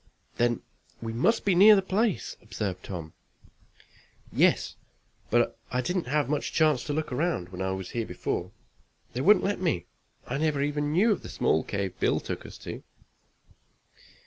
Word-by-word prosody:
"Then 120 Hz, -1 st, +1 dB, 0.4 s
we 115 Hz, -1 st, -5 dB
must 135 Hz, -, +2 dB
be 200 Hz, -, +4 dB
near 205 Hz, +4 st, +8 dB
the 195 Hz, -, +2 dB
place," 205 Hz, +2 st, 0 dB
observed 105 Hz, -4 st, -4 dB
Tom. 85 Hz, -5 st, -6 dB, 1.2 s
"Yes, -, -, +3 dB, 0.5 s
but -, -, +2 dB
I 125 Hz, +1 st, 0 dB
didn't 180 Hz, +1 st, -2 dB
have 145 Hz, 0 st, +1 dB
much 145 Hz, +1 st, -2 dB
chance 155 Hz, -6 st, +3 dB
to 145 Hz, -, -2 dB
look 155 Hz, 0 st, -2 dB
around 130 Hz, -, -1 dB
when 90 Hz, 0 st, -7 dB
I 95 Hz, -, 0 dB
was 95 Hz, -1 st, -6 dB
here 115 Hz, -2 st, -2 dB
before. -, -, -3 dB, 0.6 s
They 125 Hz, -, -2 dB
wouldn't 200 Hz, +4 st, +5 dB
let 200 Hz, -1 st, 0 dB
me. 160 Hz, -, 0 dB, 0.4 s
I 135 Hz, -, -3 dB
never 150 Hz, -3 st, +1 dB
even 145 Hz, 0 st, -1 dB
knew 200 Hz, +8 st, +4 dB
of 205 Hz, -, 0 dB
the -, -, -9 dB
small 80 Hz, -, +1 dB
cave 100 Hz, -2 st, -3 dB
Bill -, -, +2 dB
took -, -, -6 dB
us -, -, -11 dB
to." -, -, -6 dB
145 Hz, 170 wpm, -28 LUFS, 115-180 Hz, 1.2 s, near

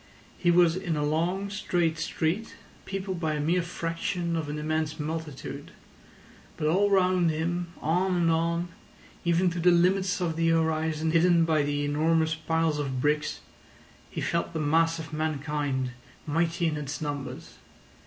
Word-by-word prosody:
He 175 Hz, -, +1 dB
was 175 Hz, -1 st, +5 dB
in 180 Hz, -4 st, -2 dB
a 150 Hz, -, 0 dB
long, 175 Hz, +6 st, 0 dB
straight 175 Hz, -5 st, 0 dB
street, 165 Hz, +7 st, -2 dB, 0.3 s
peopled 190 Hz, -2 st, -4 dB
by 160 Hz, -2 st, 0 dB
a -, -, -2 dB
mere 170 Hz, +5 st, +2 dB
fraction 170 Hz, +1 st, -2 dB
of 160 Hz, -3 st, -2 dB
an 150 Hz, -, -3 dB
immense 155 Hz, 0 st, -2 dB
multitude; 155 Hz, -2 st, -5 dB, 0.9 s
but -, -, -2 dB
all 190 Hz, +6 st, +3 dB
round 185 Hz, -3 st, +3 dB
him, 170 Hz, +3 st, -1 dB, 0.2 s
on 180 Hz, +4 st, +1 dB
and 170 Hz, -2 st, +3 dB
on, 170 Hz, +2 st, 0 dB, 0.5 s
even 175 Hz, +1 st, +2 dB
to 175 Hz, -, -4 dB
the 175 Hz, +2 st, +5 dB
limits 180 Hz, +2 st, +3 dB
of 165 Hz, -3 st, -1 dB
the 165 Hz, 0 st, +2 dB
horizon 160 Hz, -1 st, +1 dB
hidden 170 Hz, 0 st, +4 dB
by 160 Hz, -2 st, +2 dB
the 145 Hz, 0 st, -1 dB
enormous 160 Hz, +2 st, +2 dB
piles 160 Hz, -1 st, 0 dB
of 135 Hz, -3 st, -2 dB
bricks, 150 Hz, +2 st, 0 dB, 0.7 s
he -, -, -5 dB
felt 170 Hz, 0 st, -1 dB
the 160 Hz, -, -2 dB
mass 165 Hz, +2 st, +2 dB
of 160 Hz, 0 st, -8 dB
mankind 145 Hz, -4 st, -1 dB, 0.3 s
mighty 165 Hz, +2 st, 0 dB
in 155 Hz, -2 st, 0 dB
its 145 Hz, -2 st, -4 dB
numbers. 145 Hz, -2 st, -6 dB
165 Hz, 155 wpm, -27 LUFS, 155-175 Hz, 0.9 s, was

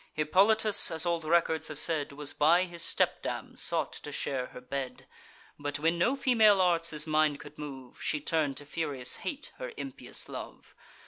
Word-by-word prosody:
Hippolytus, 200 Hz, +7 st, +4 dB
as 165 Hz, 0 st, +1 dB
old 170 Hz, -2 st, -1 dB
records 160 Hz, -1 st, +2 dB
have 155 Hz, -, -7 dB
said, 155 Hz, -2 st, +2 dB
Was 145 Hz, 0 st, -3 dB
by 170 Hz, +5 st, +4 dB
his 175 Hz, -2 st, -6 dB
stepdam -, -, -1 dB
sought -, -, 0 dB
to -, -, -7 dB
share 130 Hz, -2 st, -2 dB
her -, -, -11 dB
bed; 130 Hz, +1 st, -6 dB, 0.5 s
But, 145 Hz, 0 st, -3 dB
when 165 Hz, +3 st, 0 dB
no 240 Hz, +10 st, +2 dB
female 225 Hz, -7 st, +4 dB
arts 170 Hz, -2 st, +3 dB
his 150 Hz, -1 st, -1 dB
mind 155 Hz, -2 st, +2 dB
could 145 Hz, +1 st, -13 dB
move, 135 Hz, -4 st, -9 dB
She 150 Hz, -, -1 dB
turn'd 145 Hz, -2 st, -1 dB
to 145 Hz, -, -7 dB
furious 145 Hz, -5 st, -3 dB
hate 295 Hz, -1 st, -6 dB
her -, -, -5 dB
impious 270 Hz, -, -5 dB
love. -, -, -9 dB
160 Hz, 175 wpm, -29 LUFS, 145-175 Hz, 0.5 s, Hippolytus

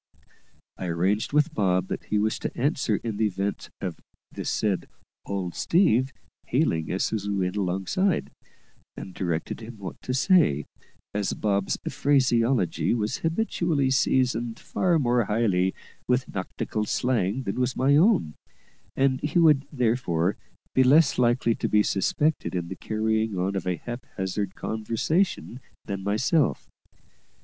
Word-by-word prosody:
I 90 Hz, -, -4 dB
arranged 95 Hz, +6 st, 0 dB
with 150 Hz, +2 st, +2 dB
Bob 95 Hz, -, +1 dB
that -, -, -4 dB
he 105 Hz, -, 0 dB
was 110 Hz, +1 st, 0 dB
to -, -, -5 dB
answer 135 Hz, -4 st, +1 dB
in 110 Hz, -3 st, -3 dB
the 110 Hz, 0 st, +2 dB
event 100 Hz, +1 st, -3 dB
of 90 Hz, -4 st, -5 dB, 0.3 s
the -, -, -6 dB
said 100 Hz, -4 st, 0 dB, 0.4 s
"old 95 Hz, -3 st, -3 dB
Steve" 135 Hz, -, +2 dB, 0.4 s
hailing 80 Hz, -1 st, 0 dB
us 95 Hz, -, -1 dB
as 105 Hz, -2 st, -2 dB
we 100 Hz, -, 0 dB
went 90 Hz, -1 st, -1 dB
alongside, 100 Hz, -, 0 dB, 0.7 s
and 95 Hz, -, -8 dB
directed 85 Hz, -3 st, -3 dB
him 115 Hz, 0 st, -9 dB
what 95 Hz, -2 st, -8 dB
to 125 Hz, -, -2 dB
say, 130 Hz, -, +3 dB, 0.5 s
as 105 Hz, -1 st, -1 dB
Bob's 100 Hz, -2 st, 0 dB
phraseology 120 Hz, -, +2 dB
was 110 Hz, +2 st, -1 dB
habitually 165 Hz, -5 st, 0 dB
seasoned 120 Hz, -3 st, +1 dB
far 175 Hz, -3 st, 0 dB
more 120 Hz, -5 st, +2 dB
highly 100 Hz, -4 st, +1 dB, 0.4 s
with 125 Hz, +1 st, +1 dB
nautical 105 Hz, +2 st, -3 dB
slang 120 Hz, 0 st, 0 dB
than 100 Hz, +2 st, -3 dB
was 125 Hz, 0 st, 0 dB
my 135 Hz, +2 st, +4 dB
own, 165 Hz, -, +3 dB, 0.6 s
and 135 Hz, -1 st, +2 dB
he 150 Hz, +3 st, -1 dB
would, 150 Hz, -5 st, +5 dB
therefore, 110 Hz, -, +1 dB, 0.4 s
be 130 Hz, -, +5 dB
less 140 Hz, +2 st, +5 dB
likely 120 Hz, -1 st, +3 dB
to -, -, -3 dB
be 105 Hz, 0 st, +4 dB
suspected 145 Hz, -, 0 dB
in 85 Hz, -1 st, -3 dB
the 95 Hz, -, -5 dB
carrying 110 Hz, 0 st, -1 dB
on 95 Hz, +2 st, -1 dB
of 95 Hz, -2 st, -3 dB
a 90 Hz, -, +1 dB
haphazard 100 Hz, -4 st, -5 dB
conversation 115 Hz, -, -1 dB, 0.3 s
than 100 Hz, -1 st, -4 dB
myself. 125 Hz, -, +1 dB
110 Hz, 140 wpm, -26 LUFS, 95-130 Hz, 0.7 s, would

